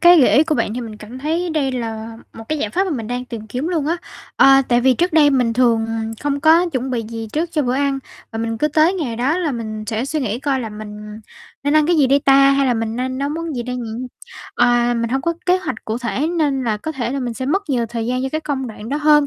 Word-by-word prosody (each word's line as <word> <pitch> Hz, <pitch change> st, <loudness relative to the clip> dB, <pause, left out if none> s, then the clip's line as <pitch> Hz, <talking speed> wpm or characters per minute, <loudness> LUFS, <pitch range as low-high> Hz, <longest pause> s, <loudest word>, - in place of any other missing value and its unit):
cái 345 Hz, -2 st, +8 dB
gợi 250 Hz, -, +5 dB
ý 300 Hz, -, +6 dB
của 310 Hz, -1 st, 0 dB
bạn 230 Hz, -2 st, -1 dB
thì 250 Hz, -, -3 dB
mình 220 Hz, -3 st, -7 dB
cảm 215 Hz, +4 st, -10 dB
thấy 330 Hz, +5 st, -1 dB
đây 285 Hz, -4 st, 0 dB
là 225 Hz, -2 st, -5 dB, 0.2 s
một 225 Hz, -, -10 dB
cái 310 Hz, -1 st, -1 dB
giải 210 Hz, -, -2 dB
pháp 380 Hz, -, +1 dB
mà 375 Hz, -, -3 dB
mình 230 Hz, -7 st, -3 dB
đang 245 Hz, +1 st, -3 dB
tìm 225 Hz, -3 st, -8 dB
kiếm 255 Hz, +9 st, -3 dB
luôn 320 Hz, -5 st, -1 dB
á. 335 Hz, +2 st, +1 dB, 0.4 s
Ờ, 270 Hz, 0 st, +7 dB
tại 240 Hz, 0 st, +3 dB
vì 260 Hz, 0 st, +4 dB
trước 350 Hz, +3 st, 0 dB
đây 300 Hz, -2 st, +5 dB
mình 250 Hz, -4 st, +2 dB
thường, 230 Hz, -2 st, +2 dB
à, 225 Hz, 0 st, -3 dB, 0.2 s
không 285 Hz, -1 st, -1 dB
có 330 Hz, +3 st, +5 dB
chuẩn 260 Hz, 0 st, -2 dB
bị 235 Hz, -2 st, -1 dB
gì 225 Hz, -1 st, -6 dB
trước 330 Hz, +3 st, -1 dB
cho 300 Hz, -3 st, +1 dB
bữa 250 Hz, 0 st, 0 dB
ăn, 275 Hz, 0 st, 0 dB, 0.3 s
và 225 Hz, -, -4 dB
mình 225 Hz, 0 st, -2 dB
cứ 300 Hz, -, +2 dB
tới 315 Hz, +5 st, +3 dB
ngày 260 Hz, -11 st, -3 dB
đó 280 Hz, +9 st, +1 dB
là 320 Hz, -6 st, -1 dB
mình 215 Hz, -2 st, -5 dB
sẽ 225 Hz, +2 st, -2 dB
suy 305 Hz, +2 st, -2 dB
nghĩ 230 Hz, -2 st, -2 dB
coi 275 Hz, -2 st, 0 dB
là 225 Hz, -, -4 dB
mình 210 Hz, 0 st, -9 dB, 0.4 s
nên 285 Hz, +1 st, +2 dB
ăn 305 Hz, 0 st, +4 dB
cái 345 Hz, -1 st, +3 dB
gì 280 Hz, -3 st, +4 dB
đây 275 Hz, +2 st, +4 dB
ta, 275 Hz, 0 st, +6 dB
hay 275 Hz, 0 st, +2 dB
là 245 Hz, -, +2 dB
mình 225 Hz, 0 st, -2 dB
nên 255 Hz, +1 st, -2 dB
nấu 280 Hz, -, -1 dB
món 320 Hz, 0 st, -4 dB
gì 240 Hz, -, -2 dB
đây 250 Hz, +1 st, -4 dB
nhỉ? 235 Hz, -3 st, -5 dB, 0.6 s
À, 240 Hz, 0 st, +3 dB
mình 230 Hz, 0 st, -1 dB
hông 265 Hz, +1 st, 0 dB
có 335 Hz, 0 st, 0 dB
kế 365 Hz, +1 st, +4 dB
hoạch 375 Hz, -, -5 dB
cụ 225 Hz, +1 st, -2 dB
thể 250 Hz, +5 st, -1 dB
nên 295 Hz, -6 st, 0 dB
là 220 Hz, -3 st, 0 dB
có 315 Hz, +9 st, -5 dB
thể 245 Hz, -5 st, -3 dB
là 275 Hz, -, -2 dB
mình 240 Hz, -2 st, -3 dB
sẽ 260 Hz, +3 st, -4 dB
mất 385 Hz, +8 st, +1 dB
nhiều 240 Hz, -3 st, +1 dB
thời 230 Hz, 0 st, -4 dB
gian 255 Hz, +1 st, -1 dB
cho 265 Hz, -, -1 dB
cái 310 Hz, -, -1 dB
công 275 Hz, -4 st, -3 dB
đoạn 220 Hz, 0 st, -8 dB
đó 285 Hz, -, -1 dB
hơn. 295 Hz, -1 st, +4 dB
260 Hz, 290 wpm, -19 LUFS, 230-300 Hz, 0.6 s, cái